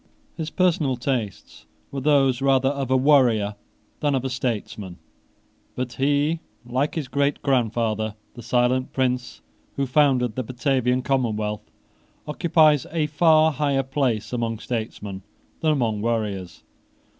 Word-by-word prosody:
His 160 -1 -4
personal 160 -8 +1
tastes 120 - -4 0.2
were 140 - -4
those 135 -3 +3
rather 135 -1 +3
of 140 -2 -3
a 130 - +4
warrior 125 -7 +3 0.5
than 145 -2 +1
of 130 0 -2
a 130 - -2
statesman: 105 -7 -4 0.8
but 125 -1 -3
he, 145 +4 +1 0.3
like 130 +4 -1
his 155 -5 -3
greatgrandfather, 120 -6 0 0.2
the 120 - -10
silent 125 +2 +1
prince 125 -1 -1 0.3
who 140 - 0
founded 130 -4 +2
the 130 - -1
Batavian 130 0 0
commonwealth, 110 -5 -1 0.6
occupies 155 -2 +3
a 160 -2 0
far 155 +1 +4
higher 140 -2 0
place 130 -5 -1
among 115 -2 -1
statesmen 105 -4 -5 0.4
than 155 - +2
among 115 -8 0
warriors. 105 -7 -3
130 Hz, 125 wpm, -23 LUFS, 115-140 Hz, 0.8 s, a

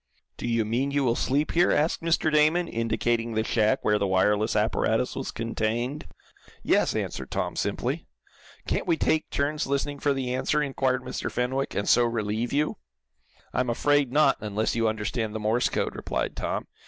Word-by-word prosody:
"Do - - -5
you 115 -2 +1
mean 120 +6 0
you 140 0 +1
will 120 -3 +2
sleep 145 +5 0
here?" 175 +1 +3
asked 155 +3 +1
Mr. 165 -1 +1
Damon, 155 +3 +3
indicating 115 -1 -1
the 110 - +1
shack 110 -1 +1
where 105 0 +3
the 100 - +1
wireless 105 +4 +2
apparatus 110 +2 +1
was - - -4
contained. 115 +5 -2 0.6
"Yes," - - +2
answered - - -3
Tom, - - -2
simply. - - -2 0.6
"Can't - - -1
we 165 -2 +2
take 155 0 +1
turns 145 +1 -1
listening 140 +1 -1
for 145 - +1
the 130 -2 -2
answer?" 140 +4 +1
inquired 130 -2 0
Mr. - - -4
Fenwick, 130 +3 -1
"and 100 - -1
so 120 - +5
relieve 115 0 -1
you?" 150 +2 0 0.8
"I'm 125 -1 0
afraid 145 +2 +2
not, 145 0 +4
unless 105 +1 -1
you 115 -1 +2
understand 110 0 -2
the - - -2
Morse 110 +3 +1
code," - - -2
replied - - -3
Tom. - - -3
125 Hz, 175 wpm, -26 LUFS, 110-145 Hz, 0.8 s, so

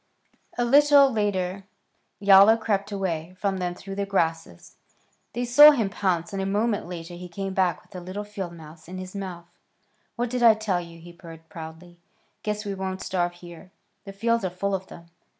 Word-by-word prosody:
A 240 - +1
little 285 +1 +6
later 195 -3 -2 0.5
Yowler 200 +2 +7
crept 205 -2 -2
away 180 -3 -3
from 195 -2 -1
them 180 -1 -3
through 195 +2 -9
the 200 0 -2
grasses. 165 - -2 0.6
They 245 +1 -2
saw 290 +5 +9
him 230 -10 +1
pounce, 180 -4 -1
and 195 - -2
a - - -2
moment 210 0 0
later 175 -1 -7
he 180 +1 -8
came 195 +2 -5
back 180 -5 0
with - - -19
a - - -5
little 190 +3 -6
field 195 -4 -7
mouse 160 -1 -13
in 185 +2 -8
his 185 0 -8
mouth. 185 -3 -6 0.7
"What 240 0 -2
did 250 -1 -2
I 230 -2 +7
tell 205 -5 -1
you?" 170 -1 -12
he 170 +1 -13
purred, 165 -2 -13
proudly. 170 0 -11 0.4
"Guess 210 0 -3
we 200 - -3
won't 190 0 -5
starve 175 -1 -1
here. 175 +1 -13 0.4
The 195 - -7
fields 230 +3 0
are 185 - 0
full 195 +3 -3
of 190 0 -3
them." 170 - -13
190 Hz, 190 wpm, -25 LUFS, 175-205 Hz, 0.7 s, saw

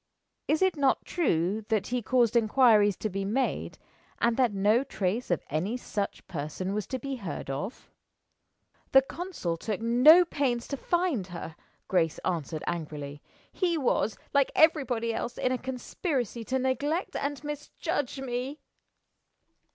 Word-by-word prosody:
"Is 315 +4 +2
it 375 -2 +3
not 275 -2 +2
true 205 - 0
that 215 -3 +1
he 250 0 0
caused 240 0 +2
inquiries 220 -3 +5
to - - -2
be 195 -1 -3
made, 230 +7 -1 0.4
and 235 0 +2
that 250 -3 +3
no 205 +5 +3
trace 220 -2 -2
of 175 - 0
any 180 - -1
such 205 -4 -4
person 165 +4 -4
was 210 -1 -2
to 260 - -3
be 270 +1 -4
heard 185 - -5
of?" 190 - -6 1.0
"The 270 0 +8
consul 305 - -4
took 210 +3 -3
no 250 +10 +7
pains 260 -7 -1
to 280 - -1
find 340 - 0
her," 170 -3 -7 0.3
Grace 165 -4 +1
answered, 160 -3 -2
angrily. 150 -4 -5 0.3
"He 350 -3 0
was, 240 -6 +1 0.2
like 280 -1 +3
everybody 255 -8 +3
else, 240 +2 -4
in 255 - 0
a 255 - +1
conspiracy 255 - -3
to 260 - 0
neglect 285 +7 -1
and 285 +1 -3
misjudge 295 -1 -3
me." 260 +3 -4
240 Hz, 145 wpm, -28 LUFS, 195-275 Hz, 1.0 s, The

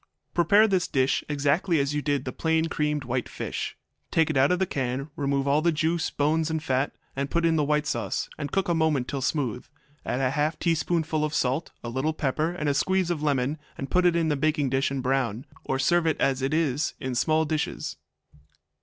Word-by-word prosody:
Prepare 200 +6 +5
this 190 -4 +1
dish 130 0 +1
exactly 150 +4 +1
as 140 +1 0
you 150 - 0
did 145 -2 -1
the 130 - -3
plain 160 +3 +1
creamed 150 -2 -1
white 125 0 -2
fish. - - -4 0.3
Take 160 -1 +2
it - - -4
out 135 +3 +4
of 180 - +3
the 190 - +1
can, 135 -1 -3
remove 140 -1 0
all 145 +2 +3
the 170 +1 +3
juice, 160 +1 0
bones, 155 +2 +1
and 160 -1 -2
fat, 135 -2 0 0.2
and 140 +1 -2
put 170 +2 +1
in 165 -1 +3
the 155 - +2
white 150 +1 +1
sauce, 115 -8 -2
and 145 -2 -5
cook 195 0 0
a 175 - +2
moment 155 -6 +1
till 140 - -3
smooth. 135 -4 -1 0.4
Add - - -2
a - - 0
small 130 - +2
half 150 +3 0
teaspoonful 160 -2 0
of 155 +1 -1
salt, 135 +4 0
a 120 - -4
little 135 +6 -1
pepper, 155 +2 0
and 175 -4 -3
a 145 - +3
squeeze 185 +4 +1
of 160 -4 -2
lemon, 145 0 0 0.2
and 135 -1 -6
put 180 0 +4
in 165 -2 +2
a - - +2
baking 150 -1 +1
dish 135 0 +1
and 135 -2 -3
brown, 130 -3 0 0.2
or 135 - 0
serve 170 +5 +2
as 135 -4 +1
it 135 - 0
is, 155 -2 0
in 130 -1 -3
small 155 +6 +2
dishes. 155 0 -3
150 Hz, 215 wpm, -26 LUFS, 135-160 Hz, 0.4 s, Prepare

